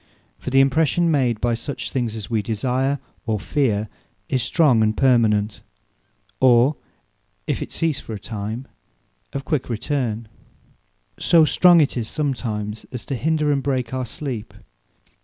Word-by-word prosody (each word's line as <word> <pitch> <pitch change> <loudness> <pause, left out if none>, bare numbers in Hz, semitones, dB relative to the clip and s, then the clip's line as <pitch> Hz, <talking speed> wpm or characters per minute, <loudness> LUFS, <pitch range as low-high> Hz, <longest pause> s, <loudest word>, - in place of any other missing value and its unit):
For - - -5
the 135 +1 +5
impression 160 +5 +2
made 125 -7 +1
by 120 +1 +1
such 125 +5 -5
things 120 -4 -2
as 110 -2 -6
wee 115 -3 0
desire, 130 +6 0 0.3
or 110 -2 0
feare, 110 -5 0 0.4
is 130 - +1
strong, 135 -5 +3
and 110 0 +1
permanent, 110 -5 +2 0.8
or, 130 +3 +5 0.7
(if - - -2
it - - -5
cease 160 -4 -1
for 115 - -8
a - - -7
time,) 110 +4 -5 0.6
of 140 -1 -5
quick 150 -6 -1
return: 120 -2 -2 0.9
so 165 -2 +5
strong 175 +1 +6
it 140 - 0
is 115 -2 -2
sometimes, 115 -8 -3
as 125 -3 -6
to 135 - -3
hinder 155 +3 +1
and 140 -1 +1
break 130 -3 -2
our 130 -1 -2
sleep. 120 -5 -5
125 Hz, 150 wpm, -22 LUFS, 110-140 Hz, 0.9 s, strong